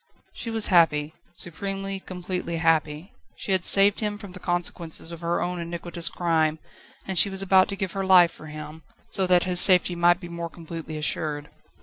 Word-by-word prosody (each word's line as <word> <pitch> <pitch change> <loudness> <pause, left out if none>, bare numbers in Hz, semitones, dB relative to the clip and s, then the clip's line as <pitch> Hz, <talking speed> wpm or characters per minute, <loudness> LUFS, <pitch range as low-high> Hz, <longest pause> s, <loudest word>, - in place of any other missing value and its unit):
She 230 - -6
was 225 -1 +1
happy 155 -3 +3 0.2
supremely, 195 +3 -2
completely 180 -2 -5
happy. 160 +1 0 0.2
She - - -5
had 190 -2 +1
saved 200 +2 +5
him 210 -1 -2
from 205 -3 -11
the 185 - -10
consequences 175 -2 -3
of 170 0 -9
her 170 0 -1
own 180 0 -3
iniquitous 170 0 -3
crime, 160 -3 0 0.5
and 190 -3 +2
she 200 - +5
was 190 0 -2
about 190 -1 +4
to 200 - -4
give 190 -2 -4
her 195 +1 -3
life 180 -3 +6
for 155 - -13
him, 150 +1 -9 0.3
so 190 -1 +1
that 180 -1 +4
his 180 -1 +1
safety 180 -1 +4
might 175 0 +3
be 175 - -9
more 170 0 -6
completely 165 -2 -8
assured. 150 -1 -2
175 Hz, 190 wpm, -24 LUFS, 165-190 Hz, 0.5 s, life